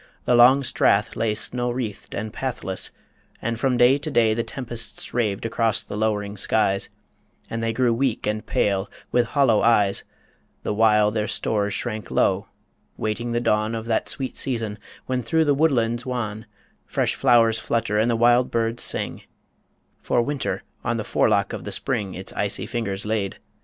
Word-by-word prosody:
The - - +3
long 125 +3 +7
Strath 105 -4 +2
lay 110 -2 0
Snow 125 +2 -1
wreathed 120 -4 -5
and 105 +1 -4
pathless, 125 -8 -2 0.5
and 115 0 -3
from 130 0 +1
day 125 +4 +5
to 155 +2 -4
day 115 -6 +3
The 115 - 0
tempests 115 -1 -5
raved 110 -4 0
across 115 -1 +1
the - - -7
low'ring 105 -1 -1
skies, 100 -1 +2 0.6
And 115 - -2
they 115 0 0
grew 120 0 +2
weak 125 -1 0
and 105 0 -1
pale, 100 -1 0 0.2
with 120 -1 +2
hollow 125 -5 +3
eyes, 105 -4 +3 0.6
The - - -1
while 105 -1 +4
their 105 0 -1
stores 100 -2 -1
shrank 110 -4 -4
low, - - +1 0.5
waiting 115 +2 -2
the 120 - +1
dawn 110 -1 +1
Of 110 0 -5
that 115 -1 0
sweet 130 -2 -3
season 115 -5 -2 0.3
when 130 -1 -1
through 160 +2 +2
woodlands 125 -6 +2
wan 110 -4 -4 0.4
Fresh - - 0
flowers 115 -4 +4
flutter 105 -1 0
and 110 +2 +2
the 115 - +2
wild 120 +2 +4
birds 115 0 -1
sing - - -1 0.8
For - - +1
Winter 145 +1 -3 0.2
on - - 0
the - - -2
forelock - - +1
of - - -5
the - - -6
Spring 100 -3 -2
Its 95 - -5
icy 100 0 -2
fingers 100 -5 -3
laid. 105 -3 -1
115 Hz, 170 wpm, -23 LUFS, 105-120 Hz, 0.8 s, long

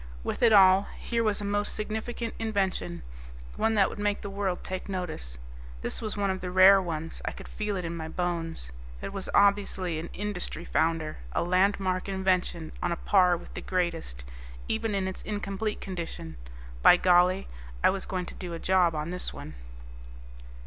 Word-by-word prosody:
With - - -3
it 235 -2 +6
all, 195 -1 +7
here 230 -1 -1
was 210 -2 0
a - - -3
most 205 +1 -1
significant 220 +2 -3
invention, 190 - -1 0.5
one 225 0 +1
that 195 -2 +5
would - - -8
make 205 0 0
the 200 - -6
world 195 -2 -2
take 185 +1 -5
notice. 160 - -4 0.5
This - - -3
was 215 -2 -4
one 200 -1 +1
of 190 - -4
the 180 - -3
rare 190 +2 +7
ones, 165 -2 -4
I - - -1
could - - -10
feel 210 -1 -3
it 180 -2 -3
in 170 0 -3
my 160 -1 -5
bones. 165 - -3 0.3
It - - -6
was 195 -1 -5
obviously 200 -4 +3
an 165 - -6
industry 190 -4 -4
founder, 160 - 0
a - - +1
landmark 185 +1 +1
invention 185 -4 0
on 175 - 0
a - - +1
par 180 0 +4
with - - -12
the - - -5
greatest, 170 - -2 0.4
even 220 -1 -1
in 190 -1 0
its 190 - -5
incomplete 205 +1 -3
condition. 170 - -6 0.5
By 175 - +8
golly, 180 +1 +4 0.4
I - - +6
was 195 0 -4
going 185 -1 -2
to - - -9
do 175 -2 -6
a - - -4
job 180 -2 +3
on 150 +2 -3
this 180 0 -1
one. 75 - -9
185 Hz, 185 wpm, -28 LUFS, 170-200 Hz, 0.5 s, By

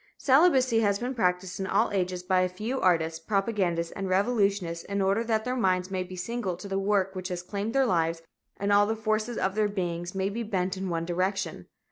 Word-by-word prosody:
Celibacy 260 -5 +4
has 200 -2 +2
been 245 +4 -3
practiced 180 -5 -1
in 190 - -2
all - - +2
ages 180 -2 -1
by 185 0 +2
a 185 - +1
few 220 +8 -4
artists, 165 -3 +2
propagandists 190 -3 0
and 195 -1 -4
revolutionists 195 -4 +1
in 200 0 -2
order 195 +3 +2
that 220 -1 0
their 250 0 -1
minds 185 -5 +1
may 190 -1 -1
be 185 0 -7
single 190 -1 -3
to 185 - -8
the 195 0 -1
work 195 -1 +1
which 185 -1 -5
has 180 -2 -4
claimed 200 +4 -3
their 270 -1 +4
lives 165 -5 0 0.3
and 200 0 +1
all 205 0 +5
the 220 - 0
forces 215 +1 -1
of 190 - 0
their 210 0 +1
beings 175 -2 -3
may 190 0 0
be 225 +4 -4
bent 190 -4 -1
in 190 0 -4
one 165 -1 -2
direction. 180 - -2
195 Hz, 215 wpm, -27 LUFS, 180-215 Hz, 0.3 s, all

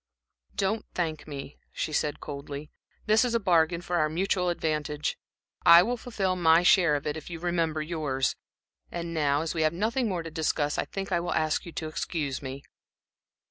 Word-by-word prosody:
"Don't 205 +3 0
thank 160 -4 -2
me," 140 -1 -8
she 155 - -3
said, 150 -1 0
coldly. 145 0 -7 0.3
"This 215 +2 +5
is 240 -2 0
a - - +3
bargain 170 -3 +3
for 175 0 -1
our 155 -2 +2
mutual 180 +2 0
advantage. 150 -3 -1 0.5
I 170 +1 +9
will 245 +4 0
fulfil 205 -6 -1
my 165 -1 +5
share 175 -4 +5
of 145 - -3
it 150 - -1
if 160 - -9
you 170 -1 -6
remember 165 -3 0
yours. 150 -5 -1 0.6
And 170 -1 -4
now, 145 -1 +2
as 165 - -2
we 165 - -1
have 155 0 +3
nothing 225 +6 0
more 175 -3 -2
to 165 - -7
discuss, 155 -2 0
I - - 0
think 195 0 -5
I 175 - +2
will 175 - -2
ask 155 +2 0
you - - -7
to 160 - -4
excuse 155 -3 -3
me." 135 0 -6
165 Hz, 190 wpm, -28 LUFS, 150-180 Hz, 0.6 s, I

